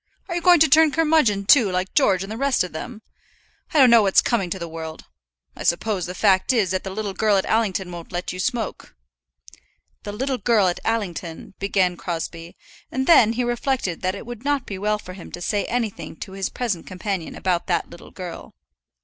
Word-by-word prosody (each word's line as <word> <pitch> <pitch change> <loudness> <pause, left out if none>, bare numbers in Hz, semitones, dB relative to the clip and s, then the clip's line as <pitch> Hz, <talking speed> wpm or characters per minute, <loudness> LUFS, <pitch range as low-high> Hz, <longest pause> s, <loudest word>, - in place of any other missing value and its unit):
Are 355 - -4
you 345 - -1
going 350 0 +6
to 320 - +7
turn 315 +2 +6
curmudgeon, 300 -11 +2
too, 225 -1 +6
like 185 +1 -2
George 190 -2 +3
and 195 - -8
the - - -4
rest 275 -1 +1
of 180 - -6
them? 215 +7 -7 0.7
I - - 0
don't 260 -4 +7
know 235 -1 +8
what's 195 -2 +4
coming 200 -7 0
to 190 - -3
the 170 -2 -5
world! 160 -1 -8 0.5
I - - -10
suppose 185 +1 0
the 180 - -6
fact 190 +1 +3
is, 215 -8 +1
that 185 +1 -2
little 205 0 -4
girl 210 0 +2
at 190 - 0
Allington 195 -5 0
won't 170 -1 -9
let 175 +1 -3
you 185 - -7
smoke." 225 - -3 1.1
"The 205 - -6
little 260 +4 -2
girl 220 -5 +3
at 175 - -3
Allington 185 -8 -3
" - - -48
began 190 -3 +1
Crosbie; 165 0 -5 0.3
and 260 +1 -1
then 230 -9 +6
he 245 +2 -1
reflected 240 -6 -1
that 185 +1 -1
it 200 - -8
would 240 0 -8
not 285 -2 0
be 195 -2 -6
well 210 +1 0
for 185 -3 -10
him 180 -2 -11
to - - -6
say 200 +3 -1
anything 230 -8 -3
to 190 - -8
his 195 -1 -3
present 215 -9 -3
companion 185 -2 -4
about 180 -2 -1
that - - -1
little 170 - -12
girl. 180 -2 -9
200 Hz, 210 wpm, -22 LUFS, 180-240 Hz, 1.1 s, know